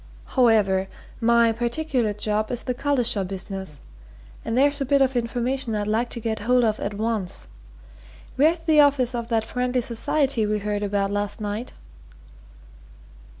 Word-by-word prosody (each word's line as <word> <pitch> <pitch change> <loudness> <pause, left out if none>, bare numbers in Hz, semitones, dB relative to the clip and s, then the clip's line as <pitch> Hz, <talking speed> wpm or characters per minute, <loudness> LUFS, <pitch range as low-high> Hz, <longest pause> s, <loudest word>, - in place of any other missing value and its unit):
However, 210 -7 +3 0.3
my 235 0 +4
particular 240 0 -1
job 210 +1 -1
is 245 - -4
the 250 - -2
Collishaw 245 -6 0
business 190 -4 -6 0.6
and 225 - -2
there's 285 +2 +3
a - - +3
bit 280 +2 +3
of 265 -1 +2
information 240 0 -1
I'd 205 -1 -1
like 225 +3 0
to 235 - -4
get 220 -1 -2
hold 245 +3 +2
of 215 -2 +1
at 200 0 -3
once. 215 -3 -3 0.9
Where's 320 +5 +3
the 315 -2 +3
office 275 -4 +4
of 235 -1 -3
that 225 -2 0
Friendly 250 +1 -1
Society 250 +1 0
we 210 0 0
heard 205 0 -2
about 200 -1 0
last 205 +1 -2
night?" 210 +3 -4
230 Hz, 150 wpm, -24 LUFS, 210-255 Hz, 0.9 s, my